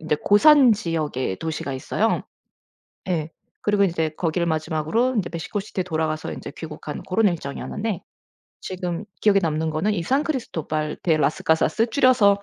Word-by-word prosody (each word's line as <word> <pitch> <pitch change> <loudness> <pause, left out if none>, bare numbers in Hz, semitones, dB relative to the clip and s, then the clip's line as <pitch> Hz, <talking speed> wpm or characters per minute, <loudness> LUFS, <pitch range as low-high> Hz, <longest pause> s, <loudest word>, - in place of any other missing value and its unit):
인제 155 -1 0
고산지역의 205 - +4
도시가 160 -3 -3
있어요. 130 - 0 0.9
예. 160 -3 -1 0.3
그리고 205 -1 +3
이제 165 -3 0
거기를 170 +2 -1
마지막으로 160 +10 0
인제 185 -5 -1
멕시코시티에 190 +4 -3
돌아가서 160 -2 -2
인제 - - -7
귀국한 155 -2 -7
고런 215 +4 +2
일정이었는데 175 +6 -4 0.6
지금 180 0 -4 0.2
기억에 200 -2 +4
남는 160 0 0
거는 190 +8 0
이산크리스토발 170 - -1
대 165 -3 +3
라스가사스 160 +8 +2
줄여서 220 -6 +4
170 Hz, 370 characters per minute, -23 LUFS, 155-210 Hz, 0.9 s, 고산지역의